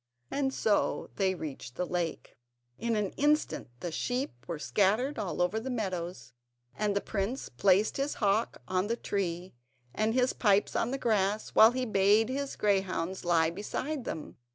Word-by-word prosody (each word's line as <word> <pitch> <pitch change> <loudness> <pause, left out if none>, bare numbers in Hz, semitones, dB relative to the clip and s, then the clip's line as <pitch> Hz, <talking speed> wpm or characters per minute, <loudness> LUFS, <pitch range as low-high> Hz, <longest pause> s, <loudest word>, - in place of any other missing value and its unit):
And 275 -1 0
so 215 -5 0
they 190 -2 +2
reached 135 -7 -7
the 180 - -1
lake. 175 -2 -3 0.4
In 230 0 0
an 210 -3 0
instant 295 - +1
the 175 - -3
sheep 250 - -1 0.2
were 170 -2 -3
scattered 215 - +1
all 180 -3 -1
over 185 +5 0
the 250 +4 -5
meadows, 180 - -4 0.4
and 210 -1 0
the 200 - +1
prince 215 +6 -3
placed 195 - +3
his 275 +2 -1
hawk 210 +1 0
on 185 +1 0
the 230 - 0
tree, 180 -4 -3 0.4
and 220 +2 0
his 255 0 +3
pipes 205 -3 +2
on 230 - +1
the 270 - -2
grass, 210 -4 +1
while 220 - +8
he 255 0 -1
bade 210 +1 +4
his 275 +1 -3
greyhounds 190 -3 0
lie 165 -2 +3
beside 255 - -4
them. 155 - -6
205 Hz, 165 wpm, -30 LUFS, 180-235 Hz, 0.4 s, while